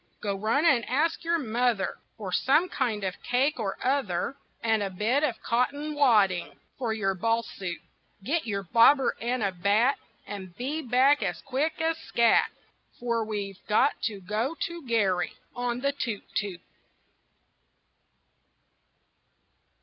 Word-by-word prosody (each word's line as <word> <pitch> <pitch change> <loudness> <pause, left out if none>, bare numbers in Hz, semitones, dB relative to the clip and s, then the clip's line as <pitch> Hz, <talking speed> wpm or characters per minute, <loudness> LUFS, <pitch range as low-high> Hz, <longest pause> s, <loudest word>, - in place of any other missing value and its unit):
Go 200 -1 -2
run 225 - +1
and 255 -8 +4
ask 315 +7 +1
your 335 0 +2
mother 240 -6 0 0.2
For 200 -4 -5
some 300 - +3
kind 225 -9 -1
of 185 -1 -3
cake 260 +3 +1
or 200 -3 -2
other, 255 -5 0 0.3
And 225 -2 +2
a 200 - -1
bit 215 +9 +1
of 250 -7 0
cotton 285 +6 0
wadding 210 -11 +3 0.2
For 240 -4 -1
your 200 -3 0
ball 230 +4 0
suit. 185 -5 -6 0.5
Get 310 +5 -1
your 200 -2 -2
bobber 235 - +5
and 240 0 -1
a 200 - +1
bat, 205 +8 +2 0.3
And 190 -3 -8
be 285 +6 -2
back 270 +2 +4
as - - -3
quick 280 +4 -1
as 325 0 0
scat, 235 -1 +3 0.5
For 235 -2 0
we've 205 -3 -4
got 225 +6 +2
to 210 -3 -2
go 215 - -2
to 335 -5 -4
Garry 195 -6 +1 0.2
On 245 0 -2
the 280 +1 +2
toot 235 -7 -4
toot. 195 -4 -3
235 Hz, 140 wpm, -27 LUFS, 205-275 Hz, 0.5 s, bobber